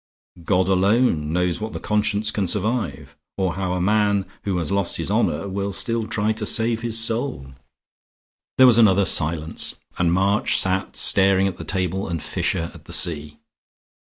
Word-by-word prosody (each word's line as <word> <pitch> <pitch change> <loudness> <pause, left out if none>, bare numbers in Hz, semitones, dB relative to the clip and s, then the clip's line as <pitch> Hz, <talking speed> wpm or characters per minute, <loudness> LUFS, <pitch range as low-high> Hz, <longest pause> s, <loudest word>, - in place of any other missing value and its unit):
God 90 +1 +1
alone 95 -4 +2
knows 90 +2 0
what 110 0 -5
the - - -5
conscience 105 0 0
can 100 -3 -1
survive, 100 - -2 0.2
or 95 -3 0
how 95 -1 -3
a 90 - -2
man 100 +1 +1 0.2
who 95 -3 -1
has 85 -1 -3
lost 100 -3 0
his - - -3
honor 80 +6 0
will 100 +1 -3
still 115 +3 -1
try 110 -1 -1
to 110 - -4
save 115 0 +1
his 115 -1 0
soul." 115 - -1 1.1
There 130 - +7
was 120 -2 +6
another 100 -3 +4
silence, 80 -1 0 0.2
and 85 -2 +2
March 100 +4 +1
sat 95 0 -2
staring 95 0 +3
at 95 - -5
the - - -7
table 95 +2 -2
and 85 -1 -3
Fisher 80 +2 -2
at - - -15
the - - -7
sea. 75 -2 -1
95 Hz, 170 wpm, -22 LUFS, 90-110 Hz, 1.1 s, There